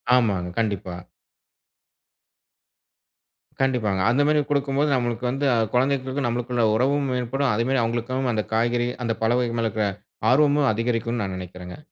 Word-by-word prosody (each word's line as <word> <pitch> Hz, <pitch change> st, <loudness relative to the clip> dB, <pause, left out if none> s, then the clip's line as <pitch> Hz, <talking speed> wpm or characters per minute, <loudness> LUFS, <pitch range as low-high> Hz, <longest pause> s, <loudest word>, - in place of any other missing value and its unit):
ஆமாங்க, 100 Hz, -8 st, +1 dB
கண்டிப்பா. 100 Hz, -5 st, -2 dB, 2.7 s
கண்டிப்பாங்க 115 Hz, -8 st, +1 dB
அந்த 140 Hz, +4 st, +2 dB
மாதிரி 150 Hz, 0 st, +3 dB
கொடுக்கும்போது 140 Hz, +1 st, +1 dB
நம்மளுக்கு 120 Hz, -1 st, -2 dB
வந்து 135 Hz, +2 st, -2 dB, 0.3 s
குழந்தைகளுக்கு 130 Hz, +1 st, 0 dB
நம்மளுக்குள்ள 120 Hz, 0 st, -1 dB
உறவும் 140 Hz, +4 st, +1 dB
மேம்படும். 125 Hz, +2 st, 0 dB
அதே 115 Hz, +2 st, +1 dB
மாதிரி 135 Hz, -1 st, +2 dB
அவங்களுக்கும் 120 Hz, +3 st, -1 dB
அந்தக் 110 Hz, -2 st, -3 dB
காய்கறி, 120 Hz, +2 st, +1 dB, 0.2 s
அந்தப் 115 Hz, -1 st, -2 dB
பழ 110 Hz, -, +2 dB
வகைகள் 120 Hz, -1 st, -1 dB
மேல 115 Hz, -, +1 dB
இருக்கிற 105 Hz, -1 st, -1 dB, 0.4 s
ஆர்வமும் 145 Hz, +1 st, +4 dB
அதிகரிக்கும்னு 115 Hz, 0 st, -1 dB
நான் 95 Hz, -1 st, -4 dB
நினைக்கிறேங்க. 90 Hz, 0 st, -9 dB
120 Hz, 130 wpm, -23 LUFS, 110-135 Hz, 2.7 s, ஆர்வமும்